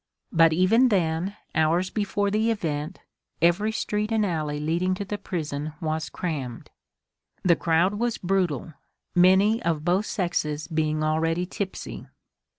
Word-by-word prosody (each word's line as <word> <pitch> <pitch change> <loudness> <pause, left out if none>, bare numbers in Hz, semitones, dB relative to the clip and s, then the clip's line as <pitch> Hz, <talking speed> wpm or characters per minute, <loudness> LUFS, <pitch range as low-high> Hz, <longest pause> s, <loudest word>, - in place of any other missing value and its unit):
But 165 -1 +5
even 195 +10 +4
then, 180 -1 0 0.2
hours 165 +4 +2
before 205 -1 0
the 215 +2 +2
event, 160 -5 -3 0.4
every 175 +6 +3
street 210 0 -2
and 220 -2 +2
alley 155 -5 -2
leading 170 +5 0
to 200 - -5
the 205 +1 -4
prison 150 -3 -4
was 155 -1 -2
crammed. 140 -9 -5 0.7
The 175 -2 +5
crowd 170 +4 +2
was 240 -1 0
brutal, 175 -5 -1 0.4
many 190 +5 +5
of 160 -5 -1
both 185 +4 +2
sexes 155 -6 -2
being 155 -1 0
already 165 +3 +1
tipsy. 190 +1 -6
175 Hz, 135 wpm, -25 LUFS, 155-200 Hz, 0.7 s, But